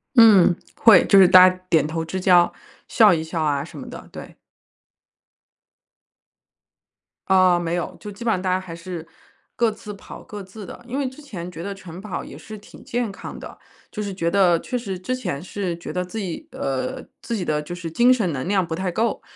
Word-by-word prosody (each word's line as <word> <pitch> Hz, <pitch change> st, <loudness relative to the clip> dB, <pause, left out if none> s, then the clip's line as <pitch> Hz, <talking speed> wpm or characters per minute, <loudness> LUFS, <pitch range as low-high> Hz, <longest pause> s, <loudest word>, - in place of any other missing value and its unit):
嗯， 205 Hz, -7 st, +7 dB, 0.2 s
会， 225 Hz, -6 st, +6 dB
就 200 Hz, -, +6 dB
是 190 Hz, -, +8 dB
大 185 Hz, +1 st, +9 dB
家 185 Hz, -, -7 dB
点 160 Hz, -2 st, +3 dB
头 160 Hz, +1 st, -3 dB
之 185 Hz, +3 st, -4 dB
交， 180 Hz, -2 st, +4 dB, 0.4 s
笑 215 Hz, -5 st, +5 dB
一 160 Hz, -2 st, -1 dB
笑 160 Hz, 0 st, -4 dB
啊 145 Hz, -2 st, 0 dB
什 160 Hz, -, -11 dB
么 -, -, -9 dB
的， -, -, -10 dB
对。 -, -, -10 dB, 2.9 s
啊， 185 Hz, -2 st, +4 dB
没 170 Hz, 0 st, -2 dB
有， 175 Hz, -, -4 dB
就 210 Hz, -, -8 dB
基 220 Hz, +4 st, -9 dB
本 225 Hz, -, +2 dB
上 185 Hz, -, -2 dB
大 185 Hz, -, -2 dB
家 185 Hz, -, +1 dB
还 185 Hz, -3 st, -9 dB
是 170 Hz, -1 st, -8 dB, 0.5 s
各 235 Hz, -2 st, +2 dB
自 210 Hz, -1 st, -9 dB
跑 200 Hz, -, -11 dB
各 210 Hz, -1 st, -8 dB
自 195 Hz, +2 st, -11 dB
的。 240 Hz, -, -11 dB
因 260 Hz, +3 st, -4 dB
为 280 Hz, -, 0 dB
之 260 Hz, +4 st, -14 dB
前 185 Hz, -, -7 dB
觉 165 Hz, -, -8 dB
得 200 Hz, +1 st, -4 dB
晨 185 Hz, -2 st, -11 dB
跑 210 Hz, -2 st, -5 dB
也 -, -, -11 dB
是 215 Hz, -, -10 dB
挺 205 Hz, -, -15 dB
健 235 Hz, -3 st, -2 dB
康 -, -, -9 dB
的， -, -, -10 dB, 0.3 s
就 210 Hz, -, -5 dB
是 200 Hz, -1 st, -4 dB
觉 170 Hz, -3 st, -1 dB
得 185 Hz, -4 st, +4 dB
确 250 Hz, -, -4 dB
实 195 Hz, -6 st, -5 dB
之 255 Hz, +7 st, -2 dB
前 155 Hz, -, -4 dB
是 185 Hz, -2 st, -4 dB
觉 170 Hz, -, -8 dB
得 180 Hz, -, -1 dB
自 180 Hz, +5 st, -8 dB
己 185 Hz, -6 st, -5 dB
呃， 130 Hz, -1 st, -3 dB, 0.2 s
自 230 Hz, -, -4 dB
己 180 Hz, -, -3 dB
的 150 Hz, -1 st, 0 dB
就 160 Hz, +4 st, -8 dB
是 175 Hz, -2 st, -6 dB
精 240 Hz, +8 st, +5 dB
神 210 Hz, -9 st, 0 dB
能量 180 Hz, +8 st, 0 dB
不 165 Hz, -1 st, -4 dB
太 185 Hz, +1 st, -2 dB
够。 225 Hz, +5 st, -1 dB
185 Hz, 230 characters per minute, -22 LUFS, 170-210 Hz, 2.9 s, 大